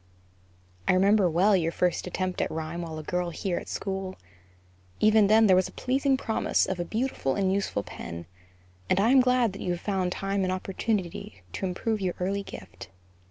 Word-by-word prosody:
I -, -, +5 dB
remember 195 Hz, 0 st, +4 dB
well 190 Hz, +5 st, +4 dB
your 165 Hz, -3 st, +1 dB
first 180 Hz, +1 st, 0 dB
attempt 185 Hz, 0 st, -2 dB
at -, -, 0 dB
rhyme 160 Hz, +2 st, -4 dB
while 160 Hz, -2 st, -6 dB
a 155 Hz, -, -6 dB
girl 180 Hz, +2 st, -1 dB
here 175 Hz, +1 st, -2 dB
at -, -, -11 dB
school; 190 Hz, -1 st, -4 dB, 0.8 s
even 215 Hz, -1 st, +5 dB
then, 220 Hz, +2 st, +6 dB
there 190 Hz, -3 st, +6 dB
was 185 Hz, 0 st, +3 dB
a -, -, -12 dB
pleasing 270 Hz, +1 st, +1 dB
promise 225 Hz, -4 st, +1 dB
of 190 Hz, -2 st, -3 dB
a -, -, 0 dB
beautiful 215 Hz, -, -1 dB
and 190 Hz, -1 st, +1 dB
useful 195 Hz, -, -1 dB
pen; 85 Hz, 0 st, -8 dB, 0.6 s
and 190 Hz, -, +3 dB
I 220 Hz, +5 st, +4 dB
am 265 Hz, -1 st, +7 dB
glad 250 Hz, -4 st, +2 dB
that -, -, -8 dB
you 180 Hz, -, -1 dB
have 175 Hz, -, -4 dB
found 190 Hz, -3 st, -1 dB
time 195 Hz, +1 st, -1 dB
and 185 Hz, -1 st, 0 dB
opportunity 185 Hz, -, -3 dB
to 190 Hz, -, -2 dB
improve 210 Hz, +4 st, -2 dB
your 185 Hz, -2 st, -1 dB
early 195 Hz, +2 st, -1 dB
gift. 95 Hz, -, -10 dB
190 Hz, 195 wpm, -27 LUFS, 175-210 Hz, 0.8 s, am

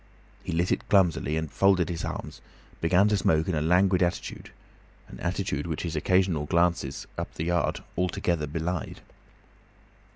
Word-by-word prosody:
He -, -, -4 dB
lit 85 Hz, +2 st, 0 dB
it -, -, -1 dB
clumsily, 85 Hz, -6 st, +3 dB
and 80 Hz, -2 st, -3 dB
folding 95 Hz, -3 st, +3 dB
his 85 Hz, -1 st, -4 dB
arms -, -, -6 dB, 0.4 s
began 90 Hz, +5 st, +4 dB
to 105 Hz, -, +2 dB
smoke 80 Hz, -4 st, +2 dB
in 95 Hz, -, 0 dB
a 75 Hz, -, 0 dB
languid 90 Hz, +3 st, +3 dB
attitude, 85 Hz, -1 st, -2 dB, 0.6 s
an -, -, -11 dB
attitude 85 Hz, -5 st, -2 dB
which 80 Hz, -3 st, -3 dB
his 85 Hz, -2 st, -3 dB
occasional 90 Hz, -2 st, +1 dB
glances 85 Hz, -5 st, 0 dB
up -, -, -4 dB
the -, -, -3 dB
yard 85 Hz, 0 st, 0 dB
altogether 85 Hz, -3 st, -1 dB
belied. 80 Hz, +3 st, -4 dB
85 Hz, 155 wpm, -27 LUFS, 80-90 Hz, 0.6 s, began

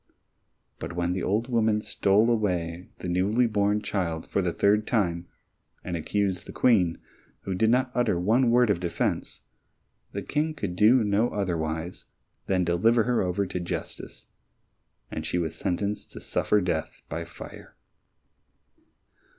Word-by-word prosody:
But -, -, -5 dB
when 90 Hz, +1 st, 0 dB
the 95 Hz, -, -2 dB
old 105 Hz, +5 st, 0 dB
woman 110 Hz, -3 st, +2 dB
stole 105 Hz, +2 st, +2 dB
away 90 Hz, -6 st, -1 dB
the -, -, -6 dB
newly 100 Hz, +7 st, +2 dB
born 105 Hz, -1 st, +1 dB
child 85 Hz, -6 st, -2 dB
for 100 Hz, -, 0 dB
the 90 Hz, -2 st, 0 dB
third 105 Hz, +4 st, +2 dB
time, 90 Hz, -6 st, 0 dB, 0.6 s
and 90 Hz, -, -3 dB
accused 95 Hz, +2 st, -1 dB
the -, -, -7 dB
Queen, 95 Hz, -9 st, +3 dB, 0.4 s
who 95 Hz, -, -3 dB
did 110 Hz, +4 st, +2 dB
not 125 Hz, +1 st, +2 dB
utter 120 Hz, -8 st, +1 dB
one 115 Hz, +7 st, +3 dB
word 120 Hz, -2 st, +4 dB
of 85 Hz, -, 0 dB
defence, 85 Hz, -1 st, -2 dB, 0.7 s
the -, -, -4 dB
King 155 Hz, +1 st, -1 dB
could 100 Hz, -, -4 dB
do 110 Hz, +6 st, +5 dB
no 105 Hz, +3 st, +2 dB
otherwise 85 Hz, -3 st, -3 dB, 0.4 s
than 95 Hz, -2 st, +2 dB
deliver 110 Hz, +7 st, +3 dB
her 120 Hz, +1 st, +1 dB
over 95 Hz, +2 st, 0 dB
to 90 Hz, -, -4 dB
justice, 85 Hz, -, -6 dB, 0.9 s
and 80 Hz, -, -4 dB
she 85 Hz, +3 st, -1 dB
was 80 Hz, -3 st, -1 dB
sentenced 100 Hz, +2 st, -3 dB
to -, -, -8 dB
suffer 105 Hz, -, +1 dB
death 90 Hz, -, -3 dB
by 80 Hz, +3 st, -4 dB
fire. -, -, -11 dB
100 Hz, 150 wpm, -27 LUFS, 90-110 Hz, 0.9 s, do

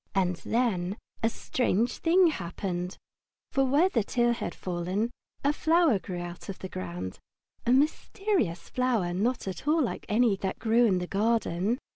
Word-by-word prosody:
And 180 Hz, -2 st, +2 dB
then 205 Hz, -5 st, 0 dB, 0.2 s
a 225 Hz, -, +3 dB
strange 235 Hz, -1 st, 0 dB
thing 360 Hz, +3 st, +5 dB
happened. 180 Hz, -, -4 dB, 0.5 s
For 270 Hz, -, +2 dB
where 285 Hz, +7 st, +4 dB
the 235 Hz, -, +1 dB
tear 240 Hz, +2 st, +2 dB
had 235 Hz, -, -4 dB
fallen 185 Hz, +6 st, -2 dB, 0.3 s
a 285 Hz, +1 st, +3 dB
flower 320 Hz, -, +3 dB
grew 180 Hz, 0 st, -6 dB
out 175 Hz, +3 st, -7 dB
of 195 Hz, -, -5 dB
the 190 Hz, -, -7 dB
ground, 90 Hz, -, -5 dB, 0.5 s
a -, -, +4 dB
mysterious 295 Hz, -, +1 dB
flower, 235 Hz, -9 st, 0 dB
not 225 Hz, +5 st, 0 dB
at 190 Hz, +9 st, -5 dB
all 315 Hz, +2 st, +4 dB
like 240 Hz, -, -4 dB
any 220 Hz, -1 st, +3 dB
that 190 Hz, 0 st, -3 dB
grew 230 Hz, +1 st, +3 dB
in 195 Hz, -5 st, +3 dB
the 180 Hz, -, -2 dB
garden. 210 Hz, 0 st, +1 dB
220 Hz, 160 wpm, -28 LUFS, 180-255 Hz, 0.5 s, thing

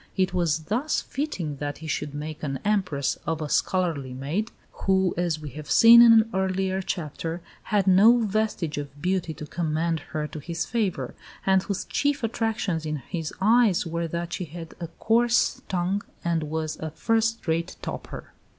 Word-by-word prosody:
It 185 Hz, -1 st, +1 dB
was 165 Hz, -3 st, +1 dB
thus 245 Hz, -, 0 dB
fitting 195 Hz, -, -4 dB
that 145 Hz, 0 st, -4 dB
he 160 Hz, -, -10 dB
should 145 Hz, -1 st, -3 dB
make 150 Hz, +1 st, -6 dB
an 135 Hz, -3 st, -2 dB
Empress 185 Hz, -10 st, 0 dB
of 165 Hz, -1 st, -1 dB
a 155 Hz, -, -3 dB
scullery 150 Hz, -7 st, 0 dB
maid, 160 Hz, -, -2 dB, 0.2 s
who, 190 Hz, -1 st, +1 dB
as 170 Hz, -3 st, 0 dB
we 150 Hz, -2 st, -7 dB
have 150 Hz, +3 st, -9 dB
seen 235 Hz, +1 st, +9 dB
in 235 Hz, -1 st, +9 dB
an 225 Hz, -1 st, +6 dB
earlier 190 Hz, 0 st, 0 dB
chapter, 165 Hz, -2 st, -4 dB, 0.3 s
had 205 Hz, -3 st, +1 dB
no 200 Hz, +6 st, +7 dB
vestige 210 Hz, -8 st, -1 dB
of 145 Hz, 0 st, -8 dB
beauty 180 Hz, 0 st, -1 dB
to 150 Hz, -, -7 dB
commend 160 Hz, +1 st, -1 dB
her 155 Hz, 0 st, -4 dB
to 155 Hz, -, -7 dB
his 165 Hz, +3 st, -3 dB
favour, 190 Hz, -, -2 dB, 0.3 s
and 190 Hz, -1 st, +4 dB
whose 195 Hz, 0 st, -3 dB
chief 285 Hz, -2 st, 0 dB
attractions 220 Hz, -7 st, -1 dB
in 155 Hz, -1 st, -2 dB
his 160 Hz, +3 st, -5 dB
eyes 215 Hz, -2 st, +4 dB
were 170 Hz, 0 st, -2 dB
that 170 Hz, +1 st, -4 dB
she 180 Hz, -, -3 dB
had 165 Hz, +1 st, -9 dB
a 170 Hz, -, -4 dB
coarse 235 Hz, +1 st, +2 dB
tongue 185 Hz, +2 st, 0 dB, 0.2 s
and 170 Hz, -1 st, +1 dB
was 155 Hz, 0 st, -3 dB
a 160 Hz, -, -4 dB
"first 225 Hz, +6 st, 0 dB
rate 165 Hz, +2 st, -1 dB
toper." -, -, -7 dB
175 Hz, 175 wpm, -25 LUFS, 155-205 Hz, 0.3 s, seen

